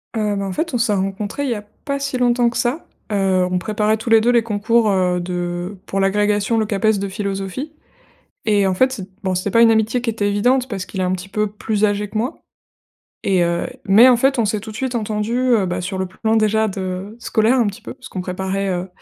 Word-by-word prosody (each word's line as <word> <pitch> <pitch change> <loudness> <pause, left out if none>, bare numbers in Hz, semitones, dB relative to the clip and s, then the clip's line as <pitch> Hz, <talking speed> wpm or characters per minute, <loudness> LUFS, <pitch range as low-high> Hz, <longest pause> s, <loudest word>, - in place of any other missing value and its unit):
Heu, 210 -2 0
bah, 200 0 -2
en 190 - -3
fait, 320 - -2
on - - +2
s'est 230 -3 +1
rencontrés 200 +7 -2
il - - -1
y - - 0
a 210 - -5 0.2
pas 280 -1 -1
si 275 -2 -2
longtemps 245 -1 +3
que 235 - -5
ça. 255 +6 -1 0.3
Heu, 190 -2 +2
on 180 - +1
préparait 215 +2 0
tous 225 +2 -5
les 225 - +7
2 240 +2 +3
les 235 -2 +3
concours, 220 +1 +1
heu, 180 -2 +1
de 175 +2 -4
pour 195 - -2
l'agrégation, 205 +2 +1
le 220 - +2
CAPES 215 0 +1
de 200 - -2
philosophie 200 +8 -4 0.7
et 205 -2 +3
en 190 - +2
fait 255 +8 +3
c'ét 200 -7 -6
bon, 190 -2 0
c'était 185 +3 -1
pas 230 - +4
une 230 -1 +7
amitié 220 +2 +2
qui 240 - -4
était 215 -2 0
évidente 245 +6 +2
parce 200 -7 -5
qu'il 190 - -8
est - - +1
un 180 - 0
petit 185 +1 -5
peu 210 +2 0
plus 210 +1 -2
âgé 205 0 0
que 215 - -8
moi 235 +5 -2 0.8
et 185 -3 +2
heu, 170 0 -1 0.2
mais 215 +6 +7
en 250 - +6
fait, 270 +2 +2
on - - +2
s'est 215 0 0
tout 220 +1 -8
de 215 - -9
suite 255 -1 -2
entendus, 215 +1 -1 0.2
heu, 200 -4 +2
bah, 180 0 -2
sur 190 +1 -4
le 190 - -1
plan 220 +4 -1
déjà 220 0 +2
de 190 +1 -5
scolaire 225 +3 +2
un 235 - +3
petit 200 - -7
peu, - - -8
puisqu'on 185 - -7
préparait, 190 +2 -2
heu, 180 +1 -2
210 Hz, 245 wpm, -20 LUFS, 190-230 Hz, 0.8 s, les